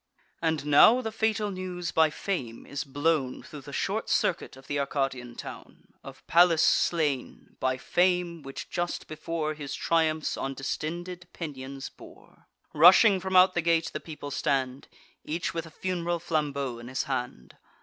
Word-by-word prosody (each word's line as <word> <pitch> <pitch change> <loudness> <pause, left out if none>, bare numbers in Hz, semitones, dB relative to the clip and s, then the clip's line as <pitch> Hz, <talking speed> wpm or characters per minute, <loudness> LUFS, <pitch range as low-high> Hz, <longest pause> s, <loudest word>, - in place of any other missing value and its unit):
And 160 -3 0
now 150 - +7
the 220 -3 -4
fatal 220 -1 0
news 180 -2 -4
by 160 -1 +4
Fame 140 -9 -4
is 140 - -4
blown 145 -1 0
Thro' 150 - -10
the - - -11
short - - -2
circuit - - 0
of 135 - -15
th' - - -11
Arcadian 135 -4 -2
town, - - -11
Of - - -12
Pallas 170 -1 +5
slain—by 135 -4 0
Fame, 175 +3 +1
which 135 -1 -8
just 175 0 -3
before 155 0 -3
His 145 -2 -6
triumphs 160 -2 +1
on 135 0 -3
distended 175 +6 -4
pinions 135 -4 -6
bore. - - -17 0.3
Rushing 185 +5 +7
from 190 0 -3
out 185 0 +7
the 175 - +1
gate, 165 0 +1
the - - -3
people 150 -3 -8
stand, 130 -1 -1 0.4
Each 165 +3 -3
with 165 -1 -4
a - - -11
fun'ral 175 0 -2
flambeau 140 -7 -2
in 120 - -10
his 130 +1 -2
hand. 125 - -5
155 Hz, 155 wpm, -28 LUFS, 135-175 Hz, 0.4 s, now